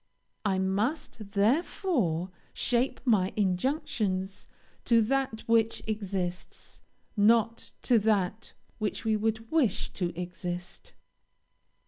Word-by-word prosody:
I 195 Hz, -3 st, +1 dB
must, 200 Hz, +2 st, -2 dB
therefore, 210 Hz, -, +1 dB, 0.2 s
shape 245 Hz, +2 st, +1 dB
my 200 Hz, -6 st, +3 dB
injunctions 195 Hz, -, -1 dB, 0.4 s
to 230 Hz, -1 st, +5 dB
that 260 Hz, -1 st, 0 dB
which 225 Hz, -1 st, +2 dB
exists, 190 Hz, -4 st, -4 dB, 0.3 s
not 230 Hz, +2 st, +3 dB
to 240 Hz, -3 st, +4 dB
that 210 Hz, 0 st, 0 dB, 0.3 s
which 215 Hz, +1 st, -2 dB
we 220 Hz, -1 st, +3 dB
would 220 Hz, +1 st, -2 dB
wish 260 Hz, -, +1 dB
to 175 Hz, -3 st, -2 dB
exist. 175 Hz, 0 st, -6 dB
215 Hz, 95 wpm, -29 LUFS, 190-230 Hz, 0.4 s, to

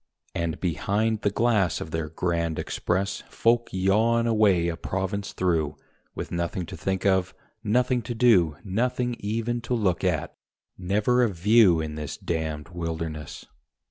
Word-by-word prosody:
And 85 Hz, -2 st, -2 dB
behind 105 Hz, +5 st, 0 dB
the -, -, +2 dB
glass 105 Hz, -4 st, +1 dB
of 80 Hz, -, -7 dB
their 80 Hz, -1 st, -2 dB
Grand 85 Hz, -1 st, -1 dB
Express 95 Hz, +3 st, -1 dB
Folk 115 Hz, +1 st, +2 dB
yawn 110 Hz, +5 st, +2 dB
away 105 Hz, -7 st, +3 dB
a 85 Hz, -, -1 dB
province 95 Hz, +3 st, -3 dB
through, 80 Hz, -5 st, 0 dB, 0.4 s
With -, -, -5 dB
nothing 85 Hz, +1 st, -2 dB
to -, -, -8 dB
think 95 Hz, 0 st, -2 dB
of, 95 Hz, -1 st, +2 dB, 0.3 s
nothing 125 Hz, +3 st, +2 dB
to 120 Hz, -, -2 dB
do, 95 Hz, -11 st, +4 dB
Nothing 120 Hz, +4 st, -1 dB
even 115 Hz, +3 st, -2 dB
to 125 Hz, +1 st, -1 dB
look 100 Hz, -6 st, 0 dB
at 90 Hz, -5 st, -1 dB, 0.4 s
never 105 Hz, +7 st, +1 dB
a 120 Hz, -, +3 dB
"view" 95 Hz, -1 st, +4 dB
In 80 Hz, -1 st, -4 dB
this 75 Hz, -2 st, -5 dB
damned 80 Hz, -1 st, -3 dB
wilderness. 80 Hz, -3 st, -5 dB
95 Hz, 145 wpm, -26 LUFS, 85-115 Hz, 0.4 s, do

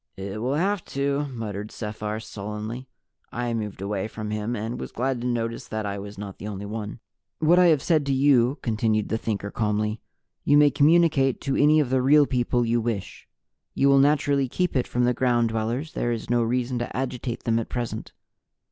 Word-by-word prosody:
"It 100 Hz, +2 st, -5 dB
will 130 Hz, +4 st, 0 dB
have 190 Hz, +3 st, 0 dB
to," 140 Hz, +1 st, -1 dB
muttered 110 Hz, -5 st, -5 dB
Sephar 105 Hz, -1 st, -4 dB
sullenly. 110 Hz, +4 st, -6 dB, 0.4 s
I 120 Hz, 0 st, -2 dB
moved 105 Hz, -4 st, -4 dB
away 100 Hz, 0 st, -2 dB
from 110 Hz, -1 st, -6 dB
him 105 Hz, +3 st, -2 dB
and 115 Hz, +3 st, -4 dB
was -, -, -6 dB
glad 130 Hz, 0 st, -1 dB
to 125 Hz, -, -2 dB
notice 115 Hz, -1 st, -2 dB
that 110 Hz, -1 st, -3 dB
I 100 Hz, 0 st, -3 dB
was 100 Hz, +1 st, -8 dB
not 100 Hz, -1 st, -7 dB
the 105 Hz, -, -6 dB
only 100 Hz, -1 st, -5 dB
one. 105 Hz, +1 st, -5 dB, 0.4 s
"What 165 Hz, +3 st, +4 dB
I 180 Hz, -, +6 dB
have 155 Hz, -5 st, +3 dB
said 155 Hz, -4 st, +2 dB
to -, -, +1 dB
you," 135 Hz, -1 st, +3 dB
continued 110 Hz, -2 st, 0 dB
the 110 Hz, -, -1 dB
Thinker 100 Hz, -2 st, -3 dB
calmly, 105 Hz, 0 st, -1 dB, 0.4 s
"you 145 Hz, -, +4 dB
may 145 Hz, -1 st, +6 dB
communicate 150 Hz, -3 st, +3 dB
to 135 Hz, -2 st, -1 dB
any 150 Hz, +2 st, +5 dB
of 135 Hz, -4 st, 0 dB
the 130 Hz, -1 st, +3 dB
Real 145 Hz, +3 st, +6 dB
People 125 Hz, -2 st, 0 dB
you 115 Hz, 0 st, +1 dB
wish. 110 Hz, -4 st, -4 dB, 0.5 s
You 140 Hz, -, +3 dB
will 140 Hz, 0 st, +6 dB
naturally 140 Hz, -1 st, +3 dB
keep 180 Hz, +4 st, -1 dB
it 130 Hz, -, +1 dB
from 125 Hz, -, 0 dB
the 125 Hz, 0 st, +3 dB
Ground 120 Hz, -2 st, +2 dB
Dwellers; 115 Hz, +7 st, -2 dB
there 120 Hz, -, -1 dB
is 115 Hz, 0 st, -4 dB
no 120 Hz, -1 st, +3 dB
reason 125 Hz, +1 st, 0 dB
to 120 Hz, -, -4 dB
agitate 125 Hz, -2 st, -3 dB
them 115 Hz, 0 st, +1 dB
at 115 Hz, -, -5 dB
present. 120 Hz, -3 st, -4 dB
120 Hz, 200 wpm, -25 LUFS, 110-135 Hz, 0.5 s, I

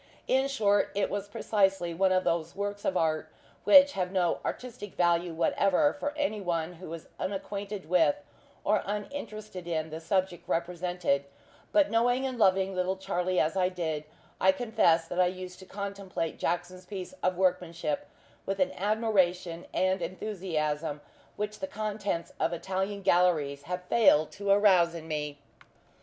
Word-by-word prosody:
In 265 Hz, +1 st, +3 dB
short, 205 Hz, -7 st, +2 dB
it 200 Hz, -, 0 dB
was 205 Hz, 0 st, -3 dB
precisely 195 Hz, -5 st, +1 dB
one 190 Hz, +3 st, +2 dB
of 185 Hz, 0 st, +3 dB
those 165 Hz, 0 st, -1 dB
works 205 Hz, 0 st, -4 dB
of 185 Hz, -, +1 dB
art 155 Hz, -2 st, 0 dB, 0.4 s
which 285 Hz, 0 st, +8 dB
have 185 Hz, -7 st, -2 dB
no 180 Hz, -3 st, +1 dB
artistic 240 Hz, -5 st, -6 dB
value 175 Hz, 0 st, +2 dB
whatever 185 Hz, -, +2 dB
for 290 Hz, +1 st, -4 dB
any 255 Hz, -8 st, -1 dB
one 170 Hz, -2 st, -1 dB
who 175 Hz, -1 st, -10 dB
is 165 Hz, -1 st, -7 dB
unacquainted 200 Hz, 0 st, -4 dB
with, 165 Hz, -4 st, +4 dB, 0.5 s
or 210 Hz, 0 st, +2 dB
uninterested 210 Hz, -3 st, -5 dB
in, 160 Hz, -2 st, -2 dB
the 160 Hz, -, -5 dB
subject 185 Hz, +1 st, -1 dB
represented; 175 Hz, -4 st, 0 dB, 0.5 s
but 305 Hz, -2 st, +4 dB
knowing 245 Hz, +3 st, +2 dB
and 255 Hz, -2 st, -3 dB
loving 190 Hz, -1 st, +3 dB
little 185 Hz, +1 st, -1 dB
Charlie 185 Hz, -1 st, -1 dB
as 160 Hz, +4 st, +1 dB
I 185 Hz, -1 st, +2 dB
did, 160 Hz, -5 st, -3 dB, 0.4 s
I 190 Hz, -, +6 dB
confess 190 Hz, -7 st, +2 dB
that 175 Hz, +2 st, -3 dB
I 180 Hz, -, +5 dB
used 185 Hz, 0 st, -6 dB
to 190 Hz, -, -12 dB
contemplate 200 Hz, -4 st, -4 dB
Jackson's 180 Hz, +2 st, -2 dB
piece 195 Hz, +3 st, -6 dB
of 185 Hz, -1 st, +1 dB
workmanship 175 Hz, -4 st, 0 dB, 0.4 s
with 195 Hz, 0 st, -2 dB
an 185 Hz, -, +2 dB
admiration 185 Hz, -5 st, 0 dB
and 185 Hz, 0 st, +1 dB
enthusiasm 165 Hz, -5 st, -2 dB, 0.3 s
which 210 Hz, +1 st, -4 dB
the 285 Hz, -, -3 dB
contents 210 Hz, -7 st, -3 dB
of 170 Hz, -, +1 dB
Italian 190 Hz, +3 st, -3 dB
gallaries 160 Hz, -7 st, +2 dB
have 180 Hz, 0 st, -3 dB
failed 180 Hz, -7 st, +4 dB
to 200 Hz, 0 st, -5 dB
arouse 190 Hz, -4 st, +5 dB
in 160 Hz, -1 st, -7 dB
me. 150 Hz, -2 st, -3 dB
185 Hz, 155 wpm, -29 LUFS, 170-205 Hz, 0.5 s, which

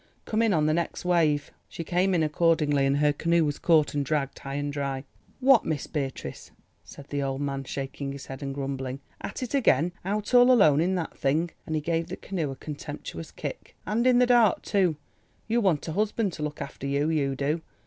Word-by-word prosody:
"Come 220 Hz, +1 st, 0 dB
in 225 Hz, -2 st, +3 dB
on 155 Hz, -5 st, +2 dB
the 155 Hz, -, +2 dB
next 170 Hz, +2 st, -2 dB
wave." 155 Hz, -5 st, +2 dB, 0.2 s
She 165 Hz, -, -6 dB
came 180 Hz, +3 st, +1 dB
in 165 Hz, -, +2 dB
accordingly 150 Hz, -3 st, +2 dB
and 140 Hz, +1 st, +2 dB
her 150 Hz, 0 st, +3 dB
canoe 170 Hz, +2 st, +2 dB
was 145 Hz, -1 st, -2 dB
caught 160 Hz, -3 st, +3 dB
and 145 Hz, -1 st, 0 dB
dragged 140 Hz, -1 st, -2 dB
high 135 Hz, 0 st, -6 dB
and 145 Hz, 0 st, -2 dB
dry. 140 Hz, -2 st, -3 dB, 0.4 s
"What, 265 Hz, -2 st, +5 dB
Miss 150 Hz, -4 st, -2 dB
Beatrice," 135 Hz, -, -5 dB, 0.3 s
said 140 Hz, -, -13 dB
the 145 Hz, -1 st, -2 dB
old 135 Hz, -1 st, -2 dB
man 140 Hz, -1 st, -3 dB
shaking 135 Hz, +1 st, -4 dB
his 140 Hz, 0 st, -8 dB
head 135 Hz, +1 st, -8 dB
and 140 Hz, -1 st, -3 dB
grumbling, 135 Hz, -1 st, -4 dB, 0.2 s
"at -, -, -5 dB
it 250 Hz, -, -5 dB
again! 180 Hz, -, +3 dB
Out 205 Hz, +5 st, -2 dB
all 245 Hz, +1 st, +7 dB
alone 155 Hz, -, +5 dB
in 185 Hz, +3 st, +1 dB
that 175 Hz, -3 st, -3 dB
thing," 160 Hz, +5 st, 0 dB, 0.2 s
and 160 Hz, -, -2 dB
he 155 Hz, -, 0 dB
gave 165 Hz, +1 st, -1 dB
the 185 Hz, -, -6 dB
canoe 170 Hz, -7 st, -3 dB
a 135 Hz, -, -5 dB
contemptuous 145 Hz, -, -7 dB
kick, -, -, -7 dB
"and 230 Hz, +5 st, +1 dB
in 250 Hz, -1 st, +5 dB
the 250 Hz, -, +5 dB
dark, 240 Hz, -5 st, +4 dB
too. 185 Hz, -5 st, +2 dB, 0.5 s
You 235 Hz, +1 st, +2 dB
want 175 Hz, -8 st, +1 dB
a -, -, -2 dB
husband 205 Hz, +1 st, 0 dB
to 160 Hz, -, -7 dB
look 150 Hz, 0 st, -3 dB
after 140 Hz, 0 st, -7 dB
you, 140 Hz, +3 st, +1 dB
you 140 Hz, -4 st, 0 dB
do. 145 Hz, +4 st, -1 dB
155 Hz, 215 wpm, -27 LUFS, 140-180 Hz, 0.5 s, all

